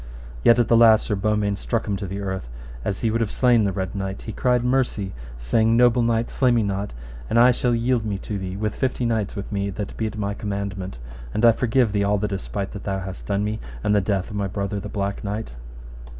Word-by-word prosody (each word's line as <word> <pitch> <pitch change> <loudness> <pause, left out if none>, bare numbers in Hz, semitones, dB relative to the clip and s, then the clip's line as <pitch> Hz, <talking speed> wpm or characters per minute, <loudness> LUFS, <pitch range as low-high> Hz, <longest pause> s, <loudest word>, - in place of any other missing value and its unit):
Yet 115 - +6
at 120 - +3
the 115 - +4
last 115 -1 +6
Sir - - -1
Beaumains 105 0 0
struck 115 -2 -1
him 100 - 0
to 100 - -5
the 100 +2 -4
earth, 95 -9 -4 0.3
and - - -7
as 100 - -2
he 115 - +1
would 115 +1 0
have 110 - 0
slain 120 -4 +4
the 100 - +1
Red 95 0 -3
Knight, 95 -1 -4
he 110 - -5
cried 125 +2 +1
mercy, 125 -6 0 0.2
saying, 110 - +2
Noble 120 0 +5
knight, 115 0 +1
slay 130 - +2
me 120 -2 +3
not, 100 0 -2 0.4
and 115 - +1
I 125 +2 +7
shall 125 -1 +1
yield 120 0 +1
me 105 -2 -2
to 100 +1 -5
thee 95 0 -5
with 105 0 -1
fifty 130 -2 -1
knights 110 -3 -1
with 100 - -6
me 100 -1 -1
that 100 +1 -5
be 110 - -1
at 110 0 -6
my 100 -1 -1
commandment. 100 - -4 0.4
And 115 - +3
I 115 - +9
forgive 120 0 +2
thee 100 0 +1
all 105 +1 +2
the 105 +1 -1
despite 100 0 -4
that 100 - -8
thou 95 -1 -2
hast 95 0 -7
done 100 0 0
to - - 0
me, 110 +1 -2 0.2
and 105 - +2
the 105 - +4
death 95 +2 -1
of - - -6
my 100 -1 -1
brother 100 +1 -3
the 105 +1 -7
Black 100 -1 -3
Knight. 105 - -4
105 Hz, 250 wpm, -23 LUFS, 100-115 Hz, 0.4 s, I